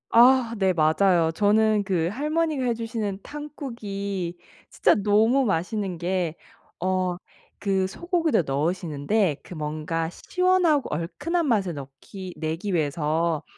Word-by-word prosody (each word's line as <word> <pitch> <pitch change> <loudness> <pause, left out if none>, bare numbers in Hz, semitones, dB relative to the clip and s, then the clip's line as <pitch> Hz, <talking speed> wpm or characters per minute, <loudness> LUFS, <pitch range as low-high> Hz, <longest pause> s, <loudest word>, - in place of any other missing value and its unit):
아 240 0 +5
네 190 -2 +2
맞아요. 165 +1 +3
저는 210 +3 +3
그 180 -4 0
할머니가 300 +2 0
해 240 - +2
주시는 225 -4 -3
탕국이 200 - -5 0.3
진짜 - - +3
너무 220 +6 +3
맛있는 195 0 -1
게 175 -1 -1 0.4
어 185 -1 0 0.5
그 195 -2 +1
소고기를 335 - 0
넣으시는데 155 +4 0
그 - - -10
뭔가 155 +1 -3
시원하고 360 - +1
얼큰한 295 - -2
맛을 195 - +1
넣기 145 +7 -9
내기 165 +5 -3
위해서 155 0 0
195 Hz, 250 characters per minute, -25 LUFS, 165-230 Hz, 0.5 s, 아